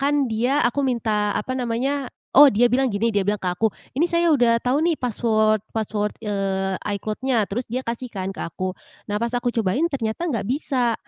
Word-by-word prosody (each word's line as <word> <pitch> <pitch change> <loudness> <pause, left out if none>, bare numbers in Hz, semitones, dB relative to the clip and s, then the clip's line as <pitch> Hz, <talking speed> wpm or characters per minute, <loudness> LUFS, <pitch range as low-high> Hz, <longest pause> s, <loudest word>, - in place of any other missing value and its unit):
kan 285 0 +2
dia 245 +5 +1
aku 280 +4 0
minta, 220 -5 0
apa 255 +5 -2
namanya 260 +3 -1 0.2
oh, 290 +2 +10
dia 235 +3 +4
bilang 265 +2 +2
gini. 215 +3 0
Dia 200 - +3
bilang 205 0 +1
ke 185 - -3
aku, 215 +5 +1 0.2
“Ini 310 +7 +2
saya 340 -1 +3
udah 235 -4 +4
tahu 265 +5 +1
nih 340 - +3
password 215 -3 +1
password, 210 -1 -1
eee, 195 -2 -1 0.2
iCloud-nya,” 225 +3 0
terus 240 +5 -3
dia 255 +2 -2
kasih 235 +2 -3
kan 190 -2 -4
ke - - -14
aku. 185 +3 -3 0.4
Nah 210 - 0
pas 235 - 0
aku 245 0 0
cobain 225 - 0
ternyata 255 +3 -2
nggak 225 -7 -2
bisa. 255 -4 0
235 Hz, 195 wpm, -23 LUFS, 210-260 Hz, 0.4 s, oh